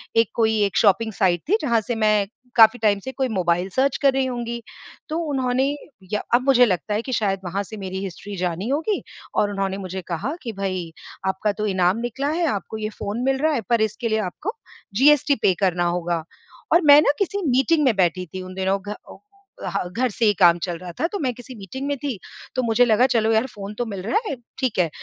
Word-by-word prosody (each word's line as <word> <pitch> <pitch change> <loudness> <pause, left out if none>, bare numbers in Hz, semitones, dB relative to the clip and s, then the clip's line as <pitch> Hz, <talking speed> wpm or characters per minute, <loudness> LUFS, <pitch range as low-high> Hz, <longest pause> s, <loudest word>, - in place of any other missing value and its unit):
एक 225 0 +4
कोई 220 -1 +2
एक 200 -2 0
शॉपिंग 220 +1 +3
साईट 180 -4 +2
थी, 420 - +4
जहाँ 235 -5 +2
से 240 +3 -3
मैं 215 -2 +3 0.3
काफ़ी 225 +1 +7
टाइम 210 -2 +2
से 260 +6 -6
कोई 265 0 -1
मोबाइल 180 -3 0
सर्च 260 +7 +1
कर 275 -2 +4
रही 265 0 +1
होंगी। 235 -2 -4 0.5
तो 315 - -2
उन्होंने 255 -1 +1 0.5
या 210 - +1
अब 250 - +2
मुझे 250 -3 +6
लगता 205 +1 -1
है 210 - 0
कि 260 - -6
शायद 195 -4 0
वहाँ 195 +3 -2
से 215 +3 -9
मेरी 190 -1 -5
हिस्ट्री 195 +2 -7
जानी 180 +3 -2
होगी 320 +9 0 0.3
और 205 - +2
उन्होंने 195 -1 -2
मुझे 190 -1 -5
कहा 180 - -3
कि, 235 - -4
"भई, 185 -4 -3 0.4
आपका 190 +2 0
तो 215 - 0
इनाम 185 0 +2
निकला 240 +4 -2
है, 335 +3 0
आपको 210 - -3
ये 215 -1 -3
फ़ोन 210 +1 -5
मिल 270 0 +2
रहा 315 0 +2
है, 255 - 0
पर 235 -2 +3
इसके 225 +2 -1
लिए 220 - +1
आपको 215 - -4 0.4
जीएसटी 285 +3 +5
पे 190 - +5
करना 180 -3 +1
होगा 175 -1 -1 0.5
और 340 - +6
मैं 290 0 +9
ना 295 - +4
किसी 400 +1 -1
मीटिंग 275 +5 +3
में 250 -5 +3
बैठी 180 -1 +1
थी 185 - -4
उन 185 - -9
दिनों, 190 +1 0
घ 205 - -9
अ 210 - -9 0.5
अ, - - -2
ह 175 - -3
घर 245 +7 0
से 225 - 0
ही 210 - +5
काम 175 -2 +6
चल 175 -2 -4
रहा 180 0 -8
था। - - +1
तो 405 - -2
मैं 255 -4 -1
किसी 245 +2 -11
मीटिंग 230 +6 -7
में 285 - 0
थी। 260 -6 -4 0.4
तो 255 - +1
मुझे 235 +1 +3
लगा 230 +1 +4
चलो 225 -2 +2
यार, 220 +2 +3
फ़ोन 205 -4 -8
तो 245 - 0
मिल 200 -4 -5
रहा 225 - +1
है, - - -2 0.2
ठीक 255 -5 -1
है। 170 -2 +3
220 Hz, 235 wpm, -22 LUFS, 190-255 Hz, 0.5 s, मैं